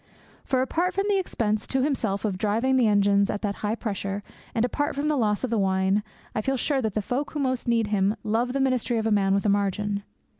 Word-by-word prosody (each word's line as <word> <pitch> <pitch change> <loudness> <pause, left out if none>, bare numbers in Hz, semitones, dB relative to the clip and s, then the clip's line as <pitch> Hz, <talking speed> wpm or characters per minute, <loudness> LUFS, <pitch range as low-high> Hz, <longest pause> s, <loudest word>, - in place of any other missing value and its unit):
For, 260 -1 +1
apart 345 +7 -1
from 390 +1 +1
the 400 -1 +3
expense 215 - -1
to 265 -1 +1
himself 225 -8 -1
of 190 -3 -2
driving 225 +6 +1
the 250 -3 +4
engines 200 -1 +3
at 205 - -3
that 200 -1 -1
high 210 +1 0
pressure, 200 -3 -3 0.3
and 230 +1 +3
apart 290 +4 -1
from 290 +2 0
the 305 - +2
loss 215 -4 +1
of 255 - -1
the 230 - +2
wine, 190 +1 +2 0.3
I 215 - -1
feel 270 +4 0
sure 275 +1 0
that 220 -4 -2
the 215 - 0
folk 260 +7 -2
who 300 - -3
most 260 -3 -1
need 230 -1 +2
him 205 0 +2
love 230 +3 0
the 275 - 0
ministry 255 -3 +1
of 220 - -1
a 225 - +1
man 195 -2 +3
with 200 - 0
a - - +3
margin. 200 0 0
220 Hz, 245 wpm, -26 LUFS, 205-260 Hz, 0.3 s, the